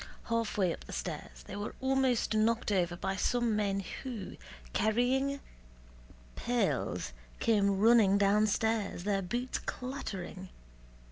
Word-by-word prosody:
Halfway 210 -6 +1
up - - -10
the - - -9
stairs - - -5
they - - -7
were 205 +1 -5
almost 265 -4 +2
knocked 220 +1 +2
over 175 -3 +1
by 195 +2 -2
some 240 +2 +1
men 200 -2 0 0.2
who, 235 -8 -6 0.4
carrying 260 +5 +2 1.0
pails, 245 -1 -1 0.3
came 200 -4 +3
running 215 -2 +6
downstairs, 210 0 +2
their 200 0 +1
boots 240 +7 -2
clattering. 195 -8 -5
215 Hz, 115 wpm, -32 LUFS, 195-240 Hz, 1.0 s, running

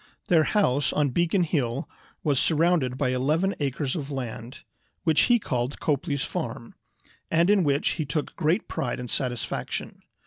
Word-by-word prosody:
Their 160 -3 +5
house 145 - +2
on 145 -2 +1
Beacon 175 +7 +2
Hill 140 -6 -1 0.4
was 145 -4 +2
surrounded 160 -6 +2
by 135 -2 +1
eleven 155 +10 +1
acres 140 -1 -1
of 145 -4 -4
land, 125 -2 -6 0.4
which 160 -2 +4
he 240 - +6
called 125 - -2
"Copley's 145 -1 0
Farm," - - -5 0.6
and 170 +4 +3
in 200 -3 +4
which 140 -2 +2
he 155 - -2
took 150 +2 -3
great 165 +8 +1
pride 160 - -3
and 125 -1 -6
satisfaction. 125 -3 -3
145 Hz, 150 wpm, -26 LUFS, 130-165 Hz, 0.6 s, he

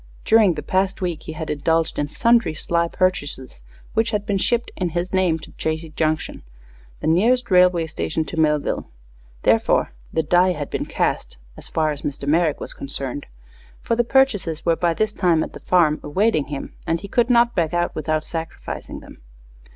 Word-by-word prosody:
During 215 -6 +5
the 150 - -5
past 190 +1 0
week 175 -4 -3
he 160 - -7
had 160 0 -4
indulged 160 +2 0
in 145 - 0
sundry 230 -1 +2
sly 170 +2 0
purchases, 145 - -2 0.3
which 225 +1 +2
had 210 -2 -2
been 200 -2 0
shipped, 240 +4 0
in 180 -2 -1
his 180 +2 -2
name 185 -4 +2
to - - -12
Chazy 160 0 -3
Junction, 155 0 -1 0.6
the - - -5
nearest 230 +9 +2
railway 180 -2 +5
station 160 0 -3
to 160 - -5
Millville. 150 -2 +1 0.5
Therefore, - - +3 0.2
the 160 - 0
"die 180 +4 +3
had 145 -4 -6
been - - -3
cast," - - -2 0.2
as - - -10
far 155 -1 0
as 145 - -6
Mr. 140 -1 -5
Merrick 160 0 +2
was - - -6
concerned, 140 0 -5 0.6
for 230 - 0
the 240 - +2
purchases 230 - +1
were 170 -1 +3
by 170 0 0
this 215 +3 0
time 170 -5 +2
at - - -7
the - - -9
farm, 165 -4 +3
awaiting 155 0 +1
him, 140 -2 -6
and 165 0 0
he 200 - -7
could 240 +4 +1
not 240 -1 +4
back 165 -4 0
out 175 0 0
without 155 0 -1
sacrificing 165 -1 -6
them. - - -14
170 Hz, 185 wpm, -22 LUFS, 155-195 Hz, 0.6 s, During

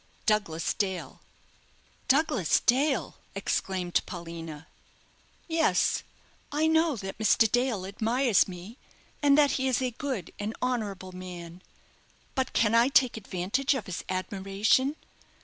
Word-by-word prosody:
"Douglas 205 -7 +1
Dale." 190 -4 -3 0.9
"Douglas 270 - +3
Dale!" 270 0 +1 0.2
exclaimed 190 -2 -1
Paulina. 165 -3 -7 0.8
"Yes, 325 -1 +2 0.5
I 300 +2 +1
know, 320 -1 +3
that 195 -2 -7
Mr. 225 +1 +4
Dale 245 -4 0
admires 225 +3 +2
me, 190 +7 -9 0.4
and 285 -1 +5
that 290 -2 +5
he 265 - +1
is 255 - +2
a 255 -1 -1
good 245 - -4
and 210 +2 -3
honourable 210 -7 -2
man; 180 -1 -9 0.7
but 260 -1 -1
can 220 -1 +2
I 230 +1 +5
take 265 -2 +3
advantage 215 +7 -1
of 235 -7 -4
his 185 - -5
admiration? 195 +8 +1
215 Hz, 120 wpm, -28 LUFS, 185-260 Hz, 0.9 s, and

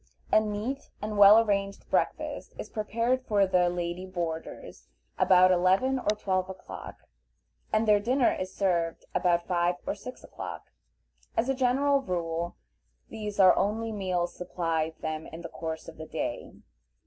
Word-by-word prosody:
A - - +7
neat 215 +6 -4
and 210 0 -4
well 205 +1 +9
arranged 200 -3 0
breakfast - - -1
is - - -7
prepared 230 +4 0
for 205 -2 +3
the 180 -2 +3
"lady 175 +1 -4
boarders" 170 -3 -6 0.3
about 185 0 +6
eleven 190 +9 +3
or 210 -3 0
twelve 185 -2 -1
o'clock, 190 - -9 0.8
and 215 +1 +2
their 210 -1 +6
dinner 245 +4 +2
is 185 0 -4
served 170 -4 -1
about 175 -1 +2
five 175 -1 +1
or - - -1
six - - -10
o'clock. - - -8 0.7
As 240 +4 +1
a - - +3
general 270 +2 +2
rule 170 -4 -3 0.5
these 210 -2 -6
are 185 -2 +8
the - - 0
only 225 +2 -1
meals 185 -4 -2
supplied 165 -3 -2
them 155 0 -4
in 165 - -9
the 170 - -6
course 160 -1 -6
of - - -10
the 160 0 -8
day. 155 -6 -4
190 Hz, 155 wpm, -28 LUFS, 175-215 Hz, 0.8 s, well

